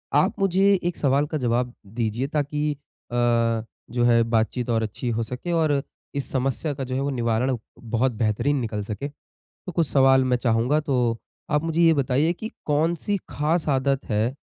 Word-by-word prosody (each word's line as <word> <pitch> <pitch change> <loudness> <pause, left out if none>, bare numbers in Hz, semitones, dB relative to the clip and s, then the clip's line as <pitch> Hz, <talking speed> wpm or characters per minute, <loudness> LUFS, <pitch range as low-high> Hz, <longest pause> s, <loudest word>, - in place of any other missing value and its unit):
आप - - +2
मुझे 195 +1 +4
एक 175 0 -1
सवाल 140 +1 +2
का 155 0 -2
जवाब 120 -1 0
दीजिए 115 +4 -2
ताकि 150 0 -1 0.4
अ, 120 - -3 0.8
जो 120 0 +1
है 120 -1 +5
बातचीत 115 +2 0
और 115 -1 +2
अच्छी 110 +3 -4
हो 115 0 0
सके 125 +9 -5
और 155 -4 +2 0.3
इस 140 - -3
समस्या 135 +3 -1
का 135 - -5
जो 130 0 -4
है 135 - 0
वो 140 - 0
निवारण 120 0 0 0.2
बहुत 120 +3 0
बेहतरीन 115 +5 0
निकल 110 -3 -3
सके। 105 +7 -4 0.4
तो 180 - -11
कुछ 165 -1 +1
सवाल 135 -1 +5
मैं 125 -1 +2
चाहूँगा 120 +4 +2
तो 125 -6 0 0.3
आप 150 0 +2
मुझे 165 0 0
ये 165 -1 +6
बताइए 140 +3 +2
कि 220 +6 -7 0.2
कौन-सी 165 +6 +1
ख़ास 155 +3 0
आदत 135 0 +1
है। 110 +5 +1
130 Hz, 180 wpm, -24 LUFS, 120-150 Hz, 0.8 s, ये